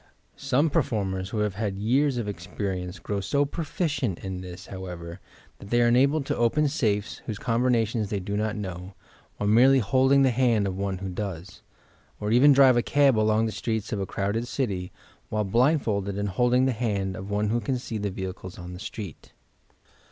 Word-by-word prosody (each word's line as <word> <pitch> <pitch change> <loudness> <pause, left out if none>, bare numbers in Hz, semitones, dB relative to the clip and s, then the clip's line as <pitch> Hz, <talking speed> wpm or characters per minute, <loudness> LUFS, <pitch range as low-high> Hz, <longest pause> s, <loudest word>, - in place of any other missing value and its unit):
Some 140 +3 +1
performers, 95 -8 -1
who 110 - -4
have 105 -2 0
had 100 -1 -3
years 130 +6 +2
of 115 -3 -2
experience, 90 -1 -4
grow 100 -1 -3
so 140 +9 +1
proficient 145 - -2
in 95 -1 -4
this, 90 0 -9
however, 90 -2 -7 0.4
that 100 - -11
they 120 - +2
are 120 0 +4
enabled 140 +4 +3
to - - -1
open 135 +6 +2
safes, 105 -7 -1
whose 110 - -3
combinations 115 -3 +1
they 100 - -1
do 100 +2 -4
not 110 0 -1
know, 95 -2 -6 0.4
while 105 - -2
merely 125 +6 +6
holding 130 +4 +4
the 130 - +4
band 120 -4 +2
of 95 -1 -2
one 95 -1 -2
who 95 +1 -5
does, 90 -2 -6 0.3
— - - -34
or 105 +1 -2
even 130 +5 +6
drive 135 -2 +6
a - - +4
cab 140 0 +3
along 110 +1 +2
the 110 - -2
streets 110 -1 -3
of 105 - -1
a 95 - -2
crowded 105 +6 -2
city, 100 -9 -2 0.4
while 105 0 0
blindfolded 105 -3 +1
and 100 0 -1
holding 125 +6 +2
the 130 - +2
hand 100 -5 -2
of 95 +2 -7
one 105 +1 0
who 120 +2 0
can 130 0 -1
see 115 -3 -5
the 100 0 -1
vehicles 95 -1 -6
on 90 0 -8
the 90 - -8
street. 105 - -8
105 Hz, 195 wpm, -26 LUFS, 95-125 Hz, 0.4 s, merely